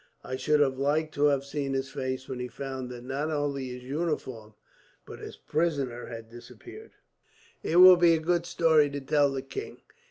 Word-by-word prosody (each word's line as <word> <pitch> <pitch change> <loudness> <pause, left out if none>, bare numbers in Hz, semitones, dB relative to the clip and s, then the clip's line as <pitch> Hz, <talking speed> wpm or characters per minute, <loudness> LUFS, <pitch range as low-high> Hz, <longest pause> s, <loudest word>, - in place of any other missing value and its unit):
I 130 - -4
should 150 +3 +2
have 135 -2 +1
liked 155 +3 0
to 145 0 +2
have 140 -2 +2
seen 140 -1 -3
his 135 0 -2
face 130 0 -4
when 130 -2 -5
he 125 - -3
found 130 0 -6
that 120 -1 -9
not 135 +4 -3
only 145 -3 -2
his 125 0 -8
uniform, 130 -7 -4 0.5
but - - -10
his - - -9
prisoner, 140 -7 -2
had 115 -1 -8
disappeared. 360 - -13 0.7
"It 165 - -2
will 180 0 +10
be 170 -1 +5
a - - -1
good 170 +1 0
story 160 -4 +3
to 145 0 -5
tell 145 +1 +2
the 135 -1 -4
king. 405 - -7
140 Hz, 190 wpm, -28 LUFS, 130-155 Hz, 0.7 s, will